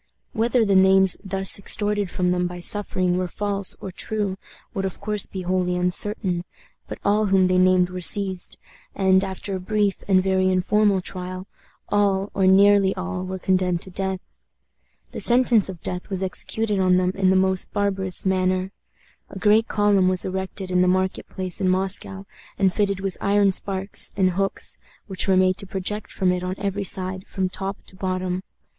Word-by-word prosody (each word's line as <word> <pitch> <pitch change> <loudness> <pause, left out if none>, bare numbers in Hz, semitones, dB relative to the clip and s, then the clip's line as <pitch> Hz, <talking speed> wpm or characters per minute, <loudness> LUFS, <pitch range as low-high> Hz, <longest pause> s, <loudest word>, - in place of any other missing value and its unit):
Whether 230 +1 +1
the 200 - +1
names 190 0 +5
thus 195 0 0
extorted 205 0 +1
from 180 0 -1
them 180 0 0
by 175 0 -8
suffering 185 -1 +1
were 185 - -2
false 200 +1 -2
or 190 - -7
true 205 0 -3 0.4
would 195 - -3
of 190 -2 -5
course 210 0 0
be 190 -1 -7
wholly 180 0 -1
uncertain, 180 0 -1 0.4
but - - -7
all 210 +1 +2
whom 190 -1 +3
they 185 0 +2
named 185 -1 +3
were 180 0 -6
seized, 190 0 +3 0.4
and, 190 -1 +3
after 195 +1 -5
a - - -4
brief 205 +1 -1
and 185 -2 +3
very 190 -1 +1
informal 195 +2 +2
trial, 185 0 -6 0.4
all, 200 -1 +1
or 190 -1 +1
nearly 195 0 +5
all, 185 0 -4
were 185 0 -5
condemned 185 -2 0
to 190 - -11
death. 190 0 -3 0.9
The - - -4
sentence 240 -4 +3
of 180 -3 -9
death 180 +2 -5
was 190 -1 -3
executed 205 +2 -1
on 185 -1 +3
them 185 0 +1
in 190 -1 +1
the 190 - +3
most 190 0 +2
barbarous 195 -3 -1
manner. 185 0 0 0.6
A - - -9
great 215 +4 +3
column 205 -3 +2
was 185 -1 0
erected 190 0 -5
in 180 0 +2
the 180 - +3
market 185 +1 -1
place 185 -2 -5
in 185 - +2
Moscow, 190 +1 -1 0.3
and 190 -2 +2
fitted 200 -2 -1
with 195 -2 -4
iron 200 0 +3
spikes 195 +1 +2
and 185 -2 +2
hooks, 195 +2 -3 0.3
which 190 -2 -2
were 190 -1 +3
made 185 0 +2
to 200 - -3
project 195 +3 -4
from 185 -2 0
it 180 0 -2
on 180 +1 -4
every 200 0 -3
side, 185 0 0
from 190 -1 -2
top 195 +1 -4
to - - -12
bottom. 185 -1 -3
190 Hz, 180 wpm, -22 LUFS, 185-200 Hz, 0.9 s, names